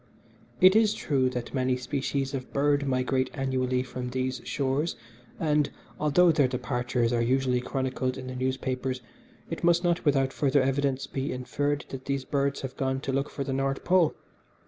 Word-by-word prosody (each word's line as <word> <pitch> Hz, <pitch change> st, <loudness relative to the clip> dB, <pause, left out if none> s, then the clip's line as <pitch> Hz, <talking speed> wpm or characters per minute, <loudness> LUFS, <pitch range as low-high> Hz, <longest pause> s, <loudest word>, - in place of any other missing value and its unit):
It 185 Hz, +1 st, +7 dB
is 215 Hz, -1 st, +4 dB
true 130 Hz, -3 st, +1 dB
that 125 Hz, -2 st, -5 dB
many 130 Hz, -1 st, +1 dB
species 135 Hz, +1 st, -2 dB
of 130 Hz, -2 st, -5 dB
birds 145 Hz, 0 st, +2 dB
migrate 130 Hz, 0 st, +1 dB
annually 130 Hz, -2 st, 0 dB
from 125 Hz, -1 st, -5 dB
these 130 Hz, 0 st, -2 dB
shores, 140 Hz, +4 st, -1 dB, 0.4 s
and, 150 Hz, -2 st, +2 dB, 0.3 s
although 165 Hz, +4 st, +5 dB
their 145 Hz, -4 st, +3 dB
departures 125 Hz, -2 st, -1 dB
are 120 Hz, -, +2 dB
usually 125 Hz, +1 st, +2 dB
chronicled 130 Hz, 0 st, -2 dB
in 130 Hz, -, -7 dB
the 130 Hz, 0 st, -6 dB
newspapers, 130 Hz, 0 st, -2 dB, 0.5 s
it 165 Hz, -, -4 dB
must 170 Hz, +1 st, +4 dB
not 175 Hz, 0 st, +1 dB
without 135 Hz, -3 st, +2 dB
further 140 Hz, -1 st, +2 dB
evidence 135 Hz, 0 st, 0 dB
be 135 Hz, +1 st, -3 dB
inferred 145 Hz, +3 st, -2 dB
that 130 Hz, -1 st, -7 dB
these 140 Hz, -1 st, -2 dB
birds 140 Hz, 0 st, 0 dB
have 135 Hz, -1 st, -6 dB
gone 130 Hz, 0 st, 0 dB
to 135 Hz, -, -3 dB
look 140 Hz, +2 st, 0 dB
for 140 Hz, -, -4 dB
the 135 Hz, -, -3 dB
North 135 Hz, 0 st, -1 dB
Pole. 180 Hz, -3 st, +3 dB
135 Hz, 170 wpm, -28 LUFS, 130-145 Hz, 0.5 s, It